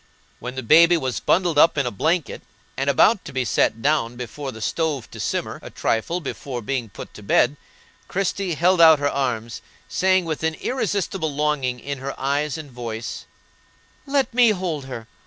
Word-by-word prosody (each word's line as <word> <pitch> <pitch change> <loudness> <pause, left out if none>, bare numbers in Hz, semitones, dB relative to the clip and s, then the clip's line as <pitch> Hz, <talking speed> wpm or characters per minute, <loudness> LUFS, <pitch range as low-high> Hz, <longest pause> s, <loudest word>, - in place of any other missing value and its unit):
When 125 +2 -6
the 130 - -4
baby 170 +7 +6
was 130 -5 -2
bundled 175 -4 +2
up 165 0 +5
in 140 - +1
a 120 - -1
blanket 160 - -1 0.3
and 135 +1 -1
about 200 - +4
to 150 - -9
be 130 -2 -1
set 115 0 +1
down 140 -5 +1
before 130 +3 -6
the 110 - -10
stove 145 +2 -2
to - - -10
simmer - - -3
a - - -9
trifle 140 +11 -1
before 135 -6 -6
being 125 -1 -2
put - - -10
to - - -11
bed, 120 +6 +3 0.5
Christie 195 -2 -1
held 175 +3 +3
out 160 -2 +8
her 145 0 0
arms, 120 -4 -2 0.3
saying 185 -1 +2
with 160 -2 -3
an 160 0 0
irresistible 195 - -2
longing 140 -4 -1
in 140 +2 -5
her 135 +1 -6
eyes 145 +2 -1
and 150 -3 -9
voice: 120 -2 -6 0.8
"Let 275 -3 +1
me 245 -1 +5
hold 180 -8 -2
her! 120 -4 -8
145 Hz, 180 wpm, -22 LUFS, 125-170 Hz, 0.8 s, out